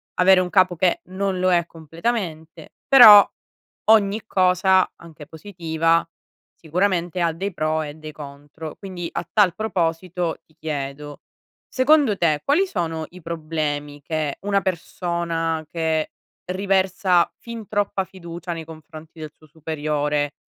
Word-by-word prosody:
avere 185 +1 +5
un 180 -1 -1
capo 185 -2 +3
che 175 +2 +1
non 190 +1 -3
lo 185 0 +2
è 170 -2 +2
completamente, 165 -1 -5
però 215 -6 +10 0.6
ogni 210 -1 +4
cosa, 185 -1 +3
anche 160 -3 -13
positiva, 165 -1 -1 0.5
sicuramente 175 +1 -1
ha 170 -1 +1
dei 195 +5 -4
pro 155 0 -1
e 145 -1 -7
dei 155 0 -10
contro, 145 +2 -10
quindi 185 -4 -7
a - - -4
tal 200 -5 +4
proposito, 175 -4 -2
ti 155 - -30
chiedo: 145 -1 -5 0.5
secondo 275 -5 +3
te 155 -4 +1
quali 330 +8 +3
sono 165 - -3
i 180 -1 -14
problemi 155 -3 -4
che 155 -1 -3
una 200 0 +1
persona, 170 -2 -2
che 160 -2 -1 0.4
riversa 190 -2 +1
fin 230 -3 -9
troppa 200 -2 -1
fiducia 175 -2 -8
nei 165 - -7
confronti 160 0 -13
del 155 -1 -7
suo 155 - -20
superiore, 150 -1 -2
170 Hz, 130 wpm, -22 LUFS, 155-190 Hz, 0.6 s, però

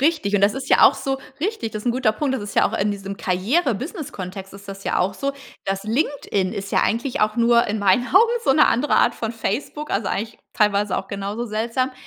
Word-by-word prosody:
Richtig 290 -9 +1
und 205 - +3
das 200 +1 +3
ist 270 - -5
ja - - +5
auch - - +7
so 270 0 -3 0.2
richtig, 375 - -2
das 215 - -6
ist - - -9
'n 240 - +3
guter 255 -3 +2
Punkt. 265 +3 -1
Das 245 - -3
ist 205 - -8
ja - - +4
auch - - -4
in 205 +2 +1
diesem 200 -1 -5
Karriere-Business-Kontext 210 - -2
ist 200 +1 -12
das 195 0 -8
ja - - 0
auch 190 +2 0
so. 275 0 -2 0.3
Das 195 +1 -2
LinkedIn 225 - -1
ist 200 -2 -6
ja - - +4
eigentlich 235 +4 -1
auch 215 +1 +1
nur 235 0 +4
in 210 +1 -1
meinen 200 +5 +3
Augen 455 +5 +5
so 275 - +3
'ne 305 +2 +5
andere 270 +6 +2
Art - - +3
von 225 - -3
Facebook, 245 +6 -4
also 200 0 0
eigentlich 225 +2 -3
teilweise 205 -2 +1
auch - - -3
genauso 200 +3 -4
seltsam, 235 +4 -1
220 Hz, 235 wpm, -22 LUFS, 200-270 Hz, 0.3 s, auch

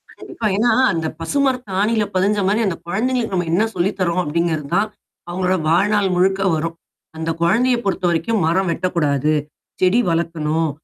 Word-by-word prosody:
கண்டிப்பா. 220 - -4
ஏன்னா, 235 +2 +3 0.2
அந்த 160 -1 -2
பசுமரத்து 255 - -1
ஆணியில 215 +1 +2
பதிஞ்ச 200 +3 +2
மாரி 210 +3 +2
அந்த 175 - -1
குழந்தைகளுக்கு 230 +3 -1
நம்ம 175 -2 -1
என்ன 205 +5 +3
சொல்லித் 190 +3 0
தர்றோம் 180 0 +1
அப்படிங்கிறது 160 -2 -1
தான். 210 +2 +2 0.4
அவவுங்களோட 185 +1 0
வாழ்நாள் 200 +3 +2
முழுக்க 190 +2 +2
வரும். 165 +1 -3 0.4
அந்த 160 +1 -3
குழந்தைய 240 +9 +3
பொறுத்தவரைக்கும் 185 +2 0
மரம் 185 +2 +1
வெட்டக்கூடாது. 155 -5 0 0.5
செடி 185 +6 +4
வளர்க்கணும். 165 -1 0
185 Hz, 145 wpm, -19 LUFS, 165-210 Hz, 0.5 s, செடி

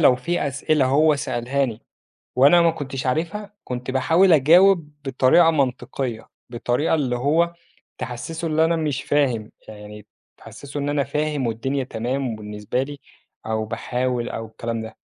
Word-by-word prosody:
لو 125 - +6
في 165 +4 -2
أسئلة 140 +1 +1
هو 150 +3 +4
سألهاني 125 -2 -2 0.5
وأنا 145 +7 +6
ما 165 -1 +4
كنتش 135 -4 -5
عارفها، 175 +10 -2
كنت 125 +1 -5
باحاول 165 +8 +4
أجاوب 170 +3 +5 0.2
بطريقة 135 +6 +4
منطقية، 130 -4 -2 0.2
بطريقة 120 +6 -1
اللي 130 -5 -1
هو 160 +7 +1 0.4
تحسّسه 160 +7 -5
اللي 160 +1 +2
أنا 170 +1 +1
مش 155 -5 -2
فاهم، 125 -7 0 0.2
يعني 105 -1 -11 0.3
تحسّسه 135 +6 -9
إن 140 0 -2
أنا 145 -1 +1
فاهم 150 -2 -1
والدنيا 135 +4 -2
تمام 125 +1 -3
وبالنسبة 105 +4 -3
لي، 145 0 -9 0.5
أو 110 0 -1
باحاول 125 +2 -2
أو 115 - -5
الكلام 115 +1 -5
ده. 110 0 -9
135 Hz, 145 wpm, -22 LUFS, 120-155 Hz, 0.5 s, لو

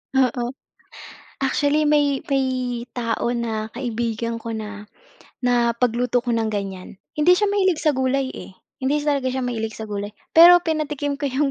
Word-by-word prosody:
Oo. 250 -2 +2 1.0
Actually 290 +3 +1
may 290 -2 +3
may 270 -1 +2 0.5
tao 235 0 -1
na 225 -2 -3
kaibigan 230 -2 -3
ko 230 - -5
na 210 -1 -7 0.5
na 245 -1 +2
pagluto 245 0 +1
ko 240 -1 -1
ng 225 -1 0
ganyan. 195 -2 -5 0.2
Hindi 305 +4 +4
siya 415 - +2
mahilig 380 -5 +2
sa 305 -3 +2
gulay, 260 0 0
eh, - - -9 0.3
hindi 285 +3 +1
talaga 280 -3 +1
siya 260 0 -2
mahilig 225 -2 -3
sa 220 - -5
gulay. 205 0 -4 0.2
Pero 350 +2 +9
pinatikim 300 -4 -2
ko 280 0 -2
yung 275 +2 +1
250 Hz, 155 wpm, -22 LUFS, 225-290 Hz, 1.0 s, Pero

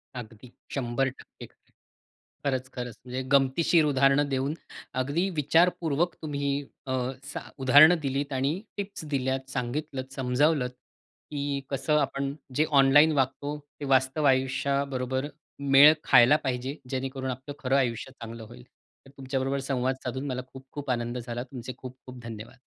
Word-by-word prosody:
अगदी. 115 0 -9 0.2
100% 130 0 -3
खरंय. - - -25 0.7
खरंच, 130 -2 0
खरंच. 125 -3 -5
म्हणजे 125 +1 -4
गमतीशीर 150 +4 +4
उदाहरणं 140 0 +3
देऊन 135 +2 0 0.5
अगदी 160 +9 0
विचारपूर्वक 165 +1 +2
तुम्ही 140 -2 -2 0.4
अ, 130 - -1 0.3
स - - -9 0.3
उदाहरणं 150 +6 +8
दिलीत 140 0 -2
आणि 135 +3 +1 0.2
टिप्स 200 -4 -5
दिल्यात, 130 0 -1
सांगितलंत, 130 +1 -4
समजावलंत 130 +1 +1 0.6
की 140 -1 -2
कसं 150 +2 +1
आपण 140 0 -1 0.2
जे 155 - +3
ऑनलाईन 145 +4 +6
वागतो, 145 +3 -1 0.2
ते 145 - -4
वास्तव 130 +3 +2
आयुष्याबरोबर 135 0 0 0.5
मेळ 145 +3 +10
खायला 125 +5 +7
पाहिजे, 130 +1 -2
जेणेकरून 130 0 -3
आपलं 130 +3 -7
खरं 135 0 +1
आयुष्य 125 0 -1
चांगलं 115 -2 -9
होईल. 60 - -12 0.4
तर 135 - -15
तुमच्याबरोबर 135 +1 -2
संवाद 130 0 0
साधून, 130 +3 -4
मला 130 -2 -2
खूप-खूप 135 +1 -6
आनंद 120 0 -2
झाला. 120 0 -4
तुमचे 125 -1 -8
खूप-खूप 130 -1 -11
धन्यवाद. 115 -1 -9
135 Hz, 130 wpm, -27 LUFS, 125-145 Hz, 0.7 s, मेळ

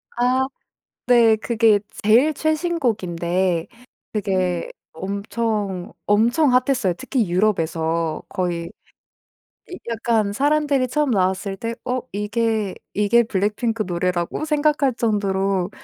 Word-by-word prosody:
아. 255 +2 +2 0.6
네. 235 -3 +5
그게 220 -2 +3 0.2
제일 250 +9 +5
최신 315 +3 0
곡인데 180 - 0 0.5
그게 185 -4 -1 0.2
엄청, 200 0 -3
엄청 240 +8 +3
핫했어요 250 -6 +2
특히 260 -6 -1
유럽에서. 165 -4 0
거의 175 -3 -2 1.1
야 - - -5
약간 225 -3 0
사람들이 285 0 +2
처음 290 +2 0
나왔을 195 -1 0
때 230 +3 -4
어 255 0 0
'이게, 210 -1 -1 0.2
이게 210 +4 +3
블랙핑크 215 +2 -1
노래라고?' 175 - -1
생각할 295 -3 +1
정도로 195 -4 0
215 Hz, 230 characters per minute, -21 LUFS, 190-250 Hz, 1.1 s, 네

